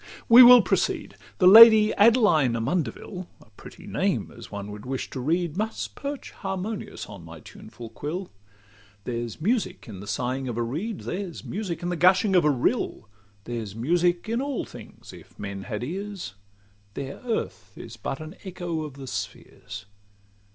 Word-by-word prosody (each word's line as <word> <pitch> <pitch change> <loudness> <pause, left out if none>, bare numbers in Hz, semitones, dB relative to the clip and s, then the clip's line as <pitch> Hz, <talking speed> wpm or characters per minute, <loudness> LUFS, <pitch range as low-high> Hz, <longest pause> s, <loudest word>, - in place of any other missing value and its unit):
—We 235 +2 +9
will 245 -1 +10
proceed. - - -1 0.2
The 185 - +2
Lady 220 +2 +9
Adeline 205 - +4
Amundeville, 155 - -3
A - - -21
pretty - - -14
name - - -1
as - - -11
one 100 0 -6
would 105 0 -9
wish 130 0 -4
to 130 - -5
read, 165 +4 -1
Must 220 +2 -3
perch 280 0 -6
harmonious 195 +2 -5
on 100 -4 -11
my 80 0 -11
tuneful 115 +8 -12
quill. 170 +10 -5 0.7
There's 120 -1 -5
music 215 +5 -1
in 100 -5 -9
the 100 - -10
sighing 125 +5 -2
of 120 -2 -4
a 120 - 0
reed; 175 - -4
There's 180 -3 -5
music 190 -5 -5
in 175 - -2
the 175 - -1
gushing 185 +4 +4
of 180 - +5
a 150 - +4
rill; 130 - -1 0.3
There's 115 -4 -6
music 175 - +1
in 230 +3 -1
all 280 -2 -3
things, - - -13
if - - -15
men 100 -1 -6
had 110 -1 -4
ears: 190 - -6 0.6
Their 140 0 -6
earth 105 - -4
is 115 - -10
but 135 +3 -5
an 155 +3 -9
echo 175 -4 -4
of 150 -3 -6
the 135 -1 -9
spheres. 100 -2 -7
155 Hz, 165 wpm, -25 LUFS, -, 0.7 s, will